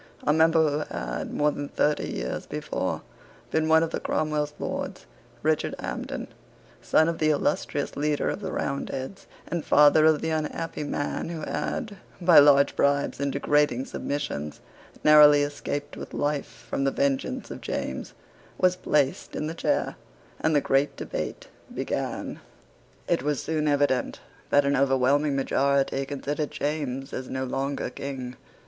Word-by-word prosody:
A 150 - +3
member 160 -2 +4
who - - -1
had, - - -4
more 150 0 +2
than 145 0 -5
thirty 150 0 0
years - - -4
before, - - -3 0.5
been 160 0 +1
one 160 0 +5
of 165 - -2
Cromwell's 150 -1 -1
Lords, - - -4 0.4
Richard 155 0 +1
Hampden, - - -5 0.5
son 160 - +3
of 170 -1 -2
the 155 - +3
illustrious 145 -1 0
leader 150 0 0
of - - -1
the 190 -2 -4
Roundheads, 140 +5 -4 0.2
and 170 -3 -2
father 150 +1 +6
of 155 -2 +3
the 160 - -1
unhappy 155 0 -3
man 145 +2 -3
who 165 -2 -5
had, 205 - -3 0.2
by 175 -3 +7
large 140 -1 +6
bribes 140 0 +1
and 140 0 0
degrading 140 -2 +2
submissions, 75 - -4 0.4
narrowly 150 -1 +8
escaped 145 0 -4
with - - -8
life 145 -1 -2
from 135 - -1
the 135 - +3
vengeance 135 0 -1
of - - -7
James, 65 - -4 0.4
was 185 0 +3
placed 145 -6 0
in 150 - -2
the 160 - -3
chair, 165 - -1 0.4
and 155 - +1
the 145 - +4
great 135 +2 +1
debate - - -5 0.2
began. - - -3 0.7
It - - +1
was 145 0 -1
soon 155 -1 -1
evident 145 -3 +1 0.3
that 145 0 +4
an 140 0 +2
overwhelming 135 +2 +2
majority 135 0 +1
considered 145 +1 -3
James 140 -3 -3
as 130 0 -5
no 130 0 -2
longer 135 0 -2
King. 130 -3 -6
145 Hz, 150 wpm, -26 LUFS, 140-155 Hz, 0.7 s, narrowly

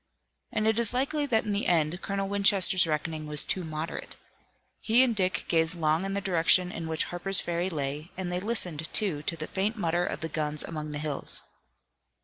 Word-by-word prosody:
And 215 - -1
it 220 +1 +2
is 235 +1 +3
likely 285 +3 0
that 225 -4 +2
in 210 - -3
the 200 0 0
end 170 +1 +2
Colonel 195 0 -2
Winchester's 195 -2 +3
reckoning 155 0 -2
was 150 -1 +3
too 185 - -2
moderate. 155 0 -5 0.6
He 235 +3 +4
and 240 -3 +1
Dick 185 -2 0
gazed 165 +1 +2
long 160 +2 +1
in 195 0 -3
the 200 - -1
direction 180 0 +3
in 165 -2 -5
which 160 0 0
Harper's 190 +2 +3
Ferry 175 +2 -1
lay, 150 0 -3
and 185 -2 -3
they 180 - -1
listened, 180 -7 -1
too, 185 -9 0
to 165 +2 -3
the 155 - -4
faint 200 +6 -1
mutter 175 -4 0
of - - -3
the 160 - -1
guns 150 -1 -1
among 155 -2 -5
the 150 - -4
hills. 150 -2 -5
175 Hz, 200 wpm, -28 LUFS, 155-200 Hz, 0.6 s, He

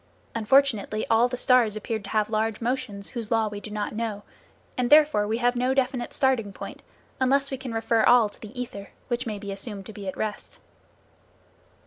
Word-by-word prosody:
Unfortunately, 225 -2 +2
all 230 +2 +5
the 250 0 -4
stars 245 -4 +3
appear 220 +1 -3
to 200 -1 -10
have 215 0 0
large 220 0 0
motions 240 -5 -3
whose 230 -4 -2
law 225 -1 +2
we 205 -1 -5
do 210 - -9
not 210 0 -3
know, 215 -2 -3 0.5
and 250 -1 0
therefore 295 -8 +5
we 220 +2 0
have 245 +1 +2
no 250 +2 +1
definite 250 -2 0
starting 255 -6 +1
point - - -9 0.4
unless 275 +2 +2
we 270 - -2
can 255 -1 -6
refer 225 0 +1
all 240 0 +6
to 205 - -15
the 225 +4 -9
ether 205 -5 -6 0.2
which 240 +1 -1
may 215 -2 -3
be 200 0 -6
assumed 195 0 -6
to 220 - -9
be 200 -2 -8
at 190 - -4
rest. 215 -1 -4
225 Hz, 195 wpm, -26 LUFS, 210-250 Hz, 0.5 s, all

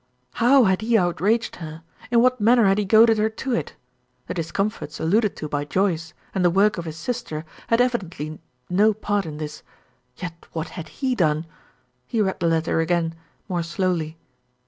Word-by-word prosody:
How 255 +3 +6
had 190 -1 +2
he 225 +1 +3
outraged 195 +5 +1
her? 160 -1 -8 0.3
In 235 -1 +4
what 255 -2 +2
manner 235 +1 +5
had 195 +1 +3
he 210 - 0
goaded 220 +2 +6
her 215 +1 +2
to 250 +4 -4
it. 235 - -2 0.5
The - - -4
discomforts 180 0 -3
alluded 205 +6 +2
to 155 - -5
by 145 -1 -2
Joyce, 170 0 -1 0.2
and 190 - 0
the 175 - +5
work 195 +2 +3
of 170 - -5
his 160 -1 -6
sister, 165 -6 -4 0.2
had 230 - +3
evidently 180 - -2 0.3
no 205 +4 +3
part 205 -3 -1
in 150 -1 -6
this; 150 -1 -6 0.6
yet 175 -2 -8
what 160 -1 -3
had 170 - -7
he 265 -2 -1
done? 160 -7 +1 0.6
He 230 - -1
read 190 -3 0
the 170 - +1
letter 165 0 +1
again, 165 0 +1 0.3
more 180 -3 -1
slowly. 170 -2 -1
185 Hz, 180 wpm, -23 LUFS, 165-220 Hz, 0.6 s, How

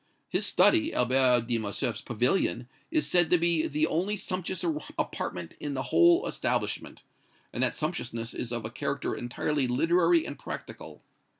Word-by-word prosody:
His - - 0
study, 325 -2 +4
Albert 125 -1 +3
de 120 -1 0
Morcerf's 110 +3 -2
pavilion, 120 - 0 0.2
is 315 -2 +1
said 175 -2 +3
to 180 - +5
be 170 -1 +2
the 150 +1 +1
only 185 +7 -1
sumptuous 185 -1 -3 0.3
apartment 90 -2 -3
in 145 -2 -4
the 130 - -2
whole 345 0 +5
establishment; - - -2 0.5
and - - -3
that - - +1
sumptuousness 120 -8 -3
is 120 - -5
of 120 -2 -3
a 110 - -5
character - - -2
entirely 130 +3 -1
literary 175 - +3
and - - -7
practical. - - -8
150 Hz, 155 wpm, -28 LUFS, 120-180 Hz, 0.5 s, to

